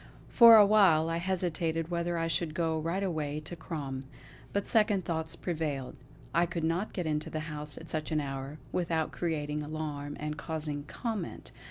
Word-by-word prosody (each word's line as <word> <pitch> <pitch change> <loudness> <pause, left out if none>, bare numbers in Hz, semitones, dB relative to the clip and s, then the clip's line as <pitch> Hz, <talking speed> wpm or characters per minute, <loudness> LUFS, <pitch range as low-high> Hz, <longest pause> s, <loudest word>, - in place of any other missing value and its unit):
For 235 -2 +9
a 210 -2 +9
while 190 -7 +5
I 165 - 0
hesitated 170 -2 0
whether 170 0 -1
I 165 0 0
should 155 0 -1
go 160 -1 0
right 170 +5 -1
away 155 -5 -2
to 155 +3 -6
Crom; 140 -6 -5 0.5
but 200 0 -1
second 210 -5 +3
thoughts 160 -1 -2
prevailed. 150 -7 -3 0.4
I 170 +1 +3
could 170 -1 -3
not 170 +6 0
get 180 - -3
into 155 -1 -1
the 155 - -3
house 150 -2 -5
at - - -6
such 155 -1 -3
an 155 - +2
hour, 135 0 -5
without 165 -3 0
creating 150 -3 -2
alarm 150 -1 -4
and 150 0 -3
causing 150 -3 -4
comment. 220 - -5
160 Hz, 175 wpm, -30 LUFS, 150-175 Hz, 0.5 s, For